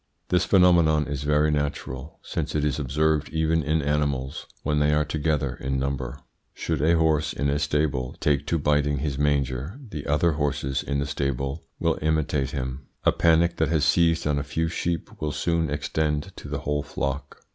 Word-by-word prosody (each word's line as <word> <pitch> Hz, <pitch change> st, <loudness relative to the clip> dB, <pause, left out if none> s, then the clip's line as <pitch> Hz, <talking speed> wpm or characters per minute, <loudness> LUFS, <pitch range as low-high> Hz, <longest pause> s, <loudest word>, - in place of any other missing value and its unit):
This 90 Hz, -1 st, +3 dB
phenomenon 85 Hz, -5 st, +5 dB
is 70 Hz, -2 st, -4 dB
very 75 Hz, +1 st, +2 dB
natural, 70 Hz, -1 st, -3 dB
since -, -, -3 dB
it 75 Hz, -1 st, +1 dB
is 75 Hz, 0 st, 0 dB
observed 75 Hz, +2 st, +1 dB
even 80 Hz, 0 st, +1 dB
in 75 Hz, +1 st, 0 dB
animals 70 Hz, -2 st, -1 dB, 0.2 s
when 75 Hz, 0 st, +1 dB
they 75 Hz, 0 st, +3 dB
are 75 Hz, 0 st, +2 dB
together 75 Hz, -3 st, -1 dB
in 65 Hz, 0 st, -1 dB
number. 65 Hz, -1 st, -2 dB, 0.4 s
Should 80 Hz, -4 st, -2 dB
a 80 Hz, +2 st, +4 dB
horse 80 Hz, -2 st, +2 dB
in 70 Hz, -, -1 dB
a 70 Hz, -, 0 dB
stable 75 Hz, -4 st, 0 dB
take 70 Hz, -1 st, +1 dB
to 85 Hz, -, +1 dB
biting 75 Hz, -1 st, +2 dB
his 70 Hz, -1 st, -2 dB
manger 70 Hz, -, 0 dB
the 75 Hz, -2 st, -5 dB
other 75 Hz, +4 st, +3 dB
horses 70 Hz, -3 st, -1 dB
in 70 Hz, -, -2 dB
the 70 Hz, -, 0 dB
stable 70 Hz, +1 st, -2 dB
will 85 Hz, -1 st, +1 dB
imitate 75 Hz, -3 st, +1 dB
him. 65 Hz, -1 st, -5 dB, 0.2 s
A -, -, +5 dB
panic 85 Hz, +1 st, +3 dB
that 80 Hz, -, +1 dB
has 80 Hz, -2 st, +2 dB
seized 85 Hz, +1 st, +3 dB
on 75 Hz, -1 st, +1 dB
a -, -, -2 dB
few 80 Hz, +3 st, -1 dB
sheep 85 Hz, 0 st, -3 dB
will 75 Hz, -1 st, -1 dB
soon 85 Hz, 0 st, 0 dB
extend 75 Hz, +1 st, -1 dB
to -, -, -9 dB
the -, -, -3 dB
whole 75 Hz, 0 st, -1 dB
flock. 70 Hz, 0 st, -4 dB
75 Hz, 185 wpm, -25 LUFS, 70-80 Hz, 0.4 s, phenomenon